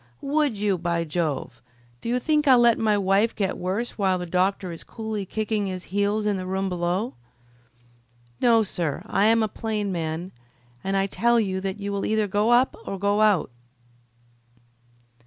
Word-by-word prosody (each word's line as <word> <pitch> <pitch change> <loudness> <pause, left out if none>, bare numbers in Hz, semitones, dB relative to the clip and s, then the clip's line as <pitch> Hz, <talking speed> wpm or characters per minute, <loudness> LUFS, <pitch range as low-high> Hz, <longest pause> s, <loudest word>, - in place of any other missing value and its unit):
"Would 285 -4 +1
you, 200 -3 0
by 170 0 0
Jove! 155 -3 -3 0.4
Do - - -4
you 245 - +2
think 300 +3 +1
I'll 260 -2 +8
let 235 -1 +4
my 215 -2 +2
wife 200 +3 +2
get 195 -3 -1
worse 200 +7 -3
while 190 -2 +2
the 180 - -4
doctor 185 +1 0
is 165 - -8
coolly 220 -3 -5
kicking 215 -1 -1
his 185 -1 -5
heels 205 +1 +1
in 205 -2 +1
the 185 0 -5
room 190 +1 -1
below? 180 +6 -1 1.3
No, 230 -2 +4
sir, 170 -7 -3
I 200 - +1
am 225 0 +4
a - - +1
plain 210 -2 -3
man, 165 +1 -3 0.5
and 195 0 0
I 195 - +2
tell 235 +4 +2
you 190 -3 -1
that 195 +1 -4
you 200 0 -4
will 200 0 -2
either 215 -1 +1
go 205 +3 +1
up 245 +2 +4
or 195 - -5
go 205 +2 +1
out." 210 -10 +3
200 Hz, 175 wpm, -24 LUFS, 185-220 Hz, 1.3 s, I'll